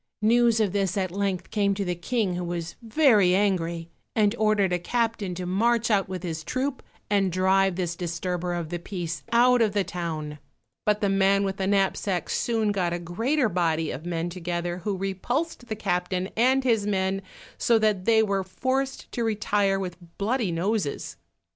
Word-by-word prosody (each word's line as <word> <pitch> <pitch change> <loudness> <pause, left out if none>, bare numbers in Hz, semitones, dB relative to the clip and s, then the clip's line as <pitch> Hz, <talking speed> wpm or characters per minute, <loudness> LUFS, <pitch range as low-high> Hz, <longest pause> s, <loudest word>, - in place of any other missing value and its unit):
News 230 0 +4
of 210 -4 +2
this 195 -2 0
at 185 -2 -1
length 195 -1 -2
came 200 -2 +1
to 200 0 -2
the 180 - 0
King, 190 +3 -1
who 180 0 -3
was 170 -1 -4
very 220 - +4
angry, 170 -4 0 0.2
and 210 -1 +3
ordered 210 -4 +2
a 175 - +1
captain 225 -2 -1
to 180 +1 -4
march 230 +5 +2
out 195 -2 +2
with 185 -1 -5
his 160 -3 -4
troop, 260 - -2 0.3
and 195 -2 +2
drive 190 +1 +3
this 175 -2 -2
disturber 175 +1 -3
of 170 -2 -4
the 175 0 -3
peace 170 -3 -5
out 245 +1 +5
of 215 -3 +2
the 205 -1 +2
town; 155 -5 -5 0.5
but 210 0 +2
the 205 - +2
man 195 0 +3
with 195 -1 -2
the 190 - -1
knapsack 195 -2 0
soon 225 -3 +1
got 180 -4 0
a - - -1
greater 225 - 0
body 165 -4 0
of 140 - -6
men 170 -1 -2
together, 175 0 -3
who 195 +2 -2
repulsed 240 - -2
the 220 - -3
captain 180 -2 -1
and 260 +4 +3
his 225 -5 +2
men, 190 -1 0 0.4
so 235 - +4
that 210 -4 +1
they 220 0 +5
were 195 -2 0
forced 265 +8 -2
to 235 - -2
retire 205 -3 +1
with 180 -3 -4 0.2
bloody 220 -1 0
noses. 180 -1 -2
195 Hz, 180 wpm, -26 LUFS, 175-220 Hz, 0.5 s, out